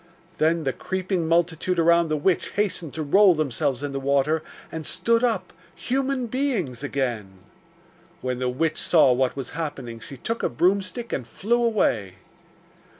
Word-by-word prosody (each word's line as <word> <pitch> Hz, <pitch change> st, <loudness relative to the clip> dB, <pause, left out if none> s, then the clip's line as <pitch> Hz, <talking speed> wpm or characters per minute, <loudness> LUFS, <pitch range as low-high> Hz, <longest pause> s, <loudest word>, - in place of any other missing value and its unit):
Then 160 Hz, +1 st, +2 dB
the 135 Hz, -2 st, 0 dB
creeping 185 Hz, -2 st, -2 dB
multitude 170 Hz, +2 st, +1 dB
around 170 Hz, 0 st, +4 dB
the 155 Hz, -1 st, 0 dB
witch 175 Hz, +4 st, 0 dB
hastened 185 Hz, -6 st, -1 dB
to 160 Hz, -, -2 dB
roll 190 Hz, +5 st, +5 dB
themselves 135 Hz, -2 st, -1 dB
in 145 Hz, -, -3 dB
the 135 Hz, -, -3 dB
water, 140 Hz, +3 st, +1 dB, 0.3 s
and 160 Hz, -1 st, -5 dB
stood 230 Hz, +9 st, +1 dB
up, 240 Hz, -2 st, 0 dB, 0.2 s
human 265 Hz, 0 st, -1 dB
beings 220 Hz, -, -2 dB
again. 120 Hz, -9 st, -3 dB, 0.8 s
When 125 Hz, -1 st, -2 dB
the 125 Hz, -1 st, 0 dB
witch 155 Hz, +5 st, -1 dB
saw 155 Hz, -7 st, +5 dB
what 130 Hz, +1 st, 0 dB
was 135 Hz, -2 st, -5 dB
happening, 135 Hz, -7 st, -5 dB
she 130 Hz, +5 st, -10 dB
took 230 Hz, -, -3 dB
a -, -, +1 dB
broomstick 195 Hz, +7 st, 0 dB
and 120 Hz, -, -3 dB
flew 235 Hz, -, 0 dB
away. 115 Hz, -, +1 dB
160 Hz, 155 wpm, -24 LUFS, 135-195 Hz, 0.8 s, roll